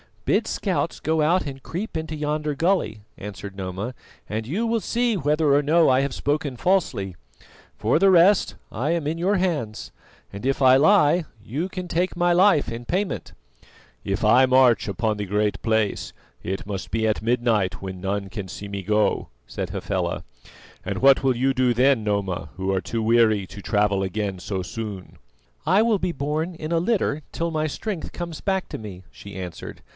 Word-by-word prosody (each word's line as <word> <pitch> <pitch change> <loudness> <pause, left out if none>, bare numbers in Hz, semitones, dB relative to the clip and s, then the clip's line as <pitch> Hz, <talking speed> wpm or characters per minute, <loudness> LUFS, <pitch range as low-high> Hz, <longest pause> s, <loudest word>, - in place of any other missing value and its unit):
"Bid - - +2
scouts - - -1
go 160 +1 +1
out 170 +4 +2
and 135 -2 -7
creep 180 +4 -5
into 160 0 -4
yonder 150 0 -2
gully," 165 - 0 0.2
answered 100 -1 -8
Noma, 95 +5 -4 0.4
"and 110 +1 -3
you 200 - -1
will 230 0 +1
see 235 +1 0
whether 150 -2 +2
or 145 - +5
no 160 +3 +4
I 130 +1 +4
have 140 -1 -2
spoken 145 -2 -1
falsely. 120 - 0 0.6
For 115 +8 +2
the 195 +1 +5
rest, 185 +2 +5 0.2
I 135 +8 -1
am 170 -3 -1
in 155 +3 -1
your 185 +5 +1
hands, 150 - -2 0.4
and 100 +5 -7
if 135 +1 0
I 130 0 +7
lie 165 0 +4 0.2
you 140 +11 -3
can 185 -1 -6
take 175 +2 0
my 175 0 +2
life 175 - +4
in 115 +1 -6
payment." 190 +8 -2 0.7
"If 95 +3 -2
I 120 +5 +6
march 130 -3 +4
upon 105 +2 -1
the 105 - -3
Great 105 +2 0
Place, 110 -2 0 0.3
it 95 +2 -4
must 100 -2 -5
be 110 0 0
at 110 - 0
midnight 115 -4 +1
when 95 -1 -6
none 100 +1 -2 0.2
see 100 +2 -8
me 100 -1 -5
go," 105 +2 +1 0.2
said - - -5
Hafela, - - -2 0.6
"and - - -2
what 135 0 +5
will 130 -2 +3
you 135 +3 +1
do 125 -2 +2
then, 125 -1 +3
Noma, 95 -6 -1
who 95 +1 -2
are 95 - 0
too 115 +2 -3
weary 110 -3 +3
to 95 +4 -10
travel 105 -2 +1
again 95 0 -2
so 95 +1 -3
soon?" 100 -1 -7 0.5
"I 190 +6 +4
will 225 -3 +2
be 180 - -1
borne 155 +5 -2
in 155 0 -6
a 165 - +3
litter 175 -6 0
till 170 0 -2
my 155 -1 0
strength 190 +3 -5
comes 170 -3 -5
back 190 -1 -1
to - - -5
me," 95 -4 -9
she 100 - -11
answered. 90 -3 -7
130 Hz, 185 wpm, -24 LUFS, 105-165 Hz, 0.7 s, I